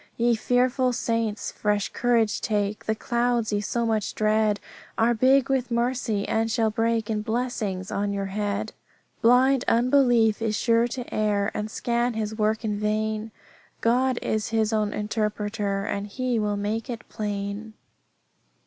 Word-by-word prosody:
"Ye 235 0 +3
fearful 250 +2 +1
saints, 230 -2 -1
fresh 210 -1 0
courage 235 -3 +1
take, 210 -1 -1
The 220 - 0
clouds 235 -1 0
ye 205 - +1
so 235 +3 -1
much 220 -3 -1
dread 215 -1 +2 0.4
Are 230 +2 +3
big 260 +3 +4
with 265 -2 0
mercy, 235 -3 0
and 225 0 0
shall 220 -1 +1
break 225 0 0
In 210 -1 -1
blessings 215 -5 -2
on 200 0 -1
your 200 -1 -2
head. 205 -1 -2 0.5
"Blind 250 +2 +4
unbelief 240 -3 +3
is 220 -1 0
sure 230 0 +3
to 250 0 -6
err, 205 -1 +1
And 210 +1 -3
scan 235 +1 -1
his 220 -1 -2
work 215 +1 0
in 210 -1 -1
vain; 215 +1 -1 0.5
God 250 +2 +2
is 215 0 -1
His 220 -1 +1
own 210 -1 +1
interpreter, 210 -1 -2
And 200 -1 -3
He 250 +2 -1
will 210 -1 0
make 215 +4 -2
it 240 -1 -6
plain." 205 +1 -4
220 Hz, 150 wpm, -25 LUFS, 210-240 Hz, 0.5 s, big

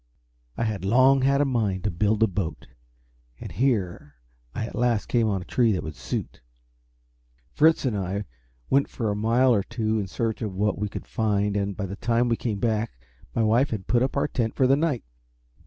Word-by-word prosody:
I - - 0
had 105 -5 -2
long 130 +6 +5
had 140 +1 +3
a - - +3
mind 110 -8 0
to 105 - 0
build 105 +5 +1
a - - +5
boat, 90 -4 -4 0.7
and - - -8
here 95 - -1 0.4
I 115 - -2
at - - -8
last 120 -3 +1
came 115 -2 +1
on 95 -3 -1
a - - -17
tree 120 +2 +2
that 90 - -2
would 80 -1 -6
suit. 65 -1 -5 1.1
Fritz 160 -1 +4
and 120 -5 0
I 100 +1 -2 0.4
went 140 +1 +2
for 110 -4 -2
a - - -1
mile 120 +4 +3
or 105 - +2
two 110 0 -1
in 100 - -3
search 115 +4 -2
of 105 -4 -3
what 105 0 0
we 105 0 -2
could - - -7
find, 105 -2 0
and 100 -1 -1
by 100 - -2
the 100 +1 -6
time 120 +2 +1
we 115 - +2
came 110 -3 -3
back 110 0 0 0.4
my 115 - +2
wife 115 +6 +3
had 105 -5 -4
put 120 0 +2
up 130 +2 0
our 140 +1 +2
tent 115 -6 -2
for 130 - +3
the 135 +2 +5
night. 145 -5 0
110 Hz, 210 wpm, -25 LUFS, 100-125 Hz, 1.1 s, long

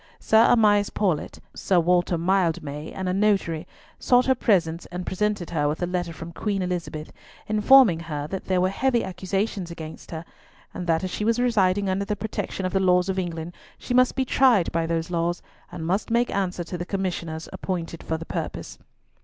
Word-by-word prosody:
Sir 220 +1 +5
Amias 205 -3 +4
Paulett, 185 -8 -1 0.2
Sir 185 -2 +1
Walter 175 +1 +2
Mildmay, 165 -4 -1
and 190 -1 -4
a 180 - 0
notary, 190 -5 +1 0.3
sought 250 0 +4
her 265 - +4
presence 170 -9 +1
and 180 0 -6
presented 205 -2 -1
her 150 -3 +1
with 150 +2 -2
a - - +3
letter 175 -1 -2
from 165 +1 -8
Queen 200 +2 -2
Elizabeth, 170 -4 -4 0.3
informing 215 -3 +6
her 150 -3 -4
that 190 +5 -5
there 185 -1 +1
were 185 +1 +2
heavy 245 +3 +1
accusations 190 0 -3
against 160 -2 -9
her, 165 0 -6 0.5
and 180 - -5
that 165 +1 +1
as 185 - -3
she 210 - -3
was 230 +2 +2
residing 200 -5 +2
under 190 +1 0
the 210 - -2
protection 205 -2 -4
of 185 - -2
the 195 - +3
laws 180 0 +3
of 190 0 0
England, 170 -1 -4 0.2
she 245 - -4
must 255 0 +4
be 265 - 0
tried 245 -9 +3
by 165 0 0
those 165 +1 -2
laws, 170 0 -1 0.3
and 160 - -6
must 190 +5 -1
make 235 +1 +1
answer 185 -3 -1
to 175 +1 -6
the - - -2
commissioners 175 -4 -3
appointed 170 -3 -4
for 160 - -2
the 165 - -8
purpose. - - -5
185 Hz, 195 wpm, -24 LUFS, 165-205 Hz, 0.5 s, informing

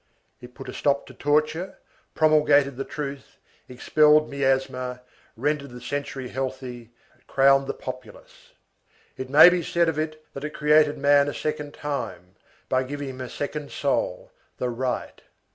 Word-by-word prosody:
It 125 0 -13
put 135 - -10
a - - -6
stop 140 -1 0
to - - -13
torture, 155 +5 0 0.4
promulgated 150 -3 +4
the 135 - -3
truth, 140 -2 -7 0.3
expelled 150 +4 +3
miasma, 130 -2 -1 0.4
rendered 140 +2 -1
the 125 0 -10
century 135 0 -5
healthy, 130 -3 -5 0.4
crowned 135 0 +4
the - - -3
populace. 130 -4 -10 0.6
It 130 0 -6
may 145 +5 +9
be 180 0 0
said 170 +1 +1
of 160 -2 -1
it 155 0 -4
that 140 - -7
it 150 0 -5
created 150 0 +4
man 140 0 +4
a 145 - -3
second 150 -1 -4
time, 140 -11 -5 0.3
by 130 0 +1
giving 140 +1 -5
him 130 0 -8
a 130 - -6
second 145 0 -5
soul, - - -2 0.3
the 125 - -2
right. 125 +1 -3
140 Hz, 150 wpm, -25 LUFS, 130-150 Hz, 0.6 s, may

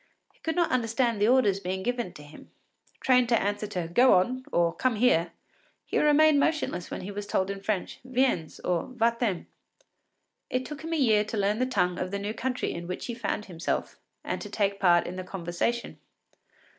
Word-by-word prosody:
He - - -30
could 320 - -2
not 345 -1 +2
understand 235 -2 +1
the 210 - +4
orders 230 -6 +4
given 190 +4 -2
him; 150 0 -13 0.5
trained 250 -2 +4
to 235 - +4
answer 205 +1 -2
to 180 -5 -3
“Go 245 +9 +5
on,” 250 +8 +1
or 170 -1 +2
“Come 255 -3 0
here,” 190 -8 +3 0.5
he - - 0
remained 300 0 +5
motionless 305 - 0
when - - -5
he 195 - -6
was 205 0 -6
told 190 -1 0
in 195 0 -6
French, 200 -2 -2
“Viens,” 255 - 0
or 175 -2 -1
“Va 235 0 +2
t’en.” 205 -8 -1 1.0
It 255 0 -1
took 300 -2 -7
him 325 +1 -3
a - - +1
year 220 -7 +4
to 215 - -4
learn 205 +2 +1
the 255 - +1
tongue 180 -8 0
of 180 - -2
the 200 - -3
new 205 +2 -3
country 255 +2 -2
in 170 0 -6
which 180 - -4
he 240 - -4
found 230 -2 -3
himself 170 -3 -3 0.2
and - - -3
to - - -7
take 200 -1 0
part 175 -2 +4
in 185 - -6
the 185 - -4
conversation. 185 +6 -3
210 Hz, 195 wpm, -27 LUFS, 185-255 Hz, 1.0 s, Go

